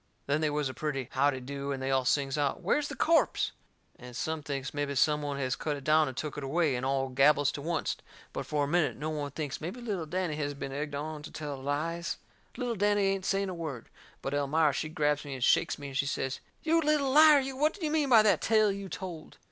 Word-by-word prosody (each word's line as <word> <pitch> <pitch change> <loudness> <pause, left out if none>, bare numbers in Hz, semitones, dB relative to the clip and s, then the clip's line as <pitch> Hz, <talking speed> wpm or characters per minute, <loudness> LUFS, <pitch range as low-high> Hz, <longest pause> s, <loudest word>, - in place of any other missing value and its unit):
Then 145 +2 +1
they 155 - +2
was 150 -1 0
a 130 - -5
pretty 135 -4 -3
howdy 135 0 +2
do, 140 +2 -5
and 135 - -2
they 135 +1 -2
all 130 -1 +2
sings 135 0 +1
out: 145 +4 -1
"Where's 290 +11 +1
the - - -6
corpse?" 330 0 +2 0.5
And 125 -1 -10
some 160 -1 -2
thinks 140 -2 -4
mebby 145 -1 -2
some 150 +2 +3
one 145 -1 -3
has 130 -2 -1
cut 150 -2 -2
it 140 - -10
down 155 +1 +4
and 130 -2 -6
took 150 -1 -4
it - - -7
away, 150 +1 +1
and 125 - -3
all 135 0 0
gabbles 145 +2 +4
to 145 - -6
oncet. 165 -4 -1 0.3
But - - -4
for 150 -1 0
a - - 0
minute 165 0 +1
no 155 +2 -3
one 145 -2 -3
thinks 145 0 -5
mebby 180 +10 -5
little 200 -9 -3
Danny 180 -1 -1
has 145 -1 -2
been 135 -1 -5
egged 145 +1 -4
on 150 +1 -4
to 150 - -9
tell 150 -2 -5
lies. 165 +5 -2 0.4
Little 245 -2 -1
Danny 205 -1 +2
ain't 195 -1 -1
saying 195 0 0
a - - -4
word. 155 -9 -6 0.3
But 135 - -2
Elmira 145 +1 +2
she 155 +3 -2
grabs 150 -1 0
me 140 -2 -6
and 130 - -4
shakes - - +3
me 145 -1 -7
and 135 - -4
she 140 - +1
says: 135 -1 -2 0.2
"You 330 +1 +3
little 300 -3 +2
liar, 305 +1 +8
you, 270 0 -3
what 300 +4 +2
do 375 -6 -4
you 300 - -1
mean 305 -3 +1
by 225 -4 +7
that 215 - +3
tale 215 -2 +4
you 195 -1 -6
told?" 175 -5 -7
150 Hz, 250 wpm, -30 LUFS, 140-185 Hz, 0.5 s, liar